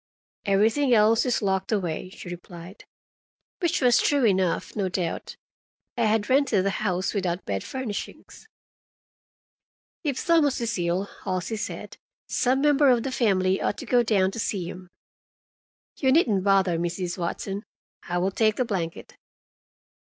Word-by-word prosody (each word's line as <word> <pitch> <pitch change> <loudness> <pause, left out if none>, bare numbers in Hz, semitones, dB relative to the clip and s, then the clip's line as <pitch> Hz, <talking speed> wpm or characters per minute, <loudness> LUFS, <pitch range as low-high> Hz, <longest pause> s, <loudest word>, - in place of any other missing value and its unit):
"Everything 225 +7 +3
else 220 +3 +4
is 245 - 0
locked 190 0 0
away," 185 -4 -2
she 185 - -11
replied. 175 +2 -10 0.7
Which 345 -4 0
was 245 -2 +5
true 285 -4 +2
enough, 190 -4 +1
no 195 -3 -1
doubt. 180 -2 -3 0.6
I 235 - +1
had 215 -1 +1
rented 260 -8 +2
the 195 - +2
house 190 -2 -1
without 185 -3 -2
bed 95 -1 -2
furnishings. 260 - -6 1.6
"If 280 -5 -2
Thomas 320 -5 +3
is 235 -1 -2
ill," 175 +2 0 0.2
Halsey 185 +3 -2
said, 210 - -6 0.3
"some 260 +2 +1
member 290 -1 +4
of 240 -2 +3
the 270 - -3
family 190 -6 +1
ought - - -1
to - - -7
go 245 -1 +3
down 200 -5 +2
to 230 - -7
see 190 -5 -2
him. 180 0 -9 1.1
You 265 -2 +2
needn't 230 - +3
bother, 190 -4 +3
Mrs. 175 +1 -3
Watson. 195 +3 -3 0.5
I 175 - 0
will 185 +2 +1
take 215 +1 +2
the 255 - 0
blanket." 175 -7 -4
200 Hz, 145 wpm, -25 LUFS, 185-245 Hz, 1.6 s, was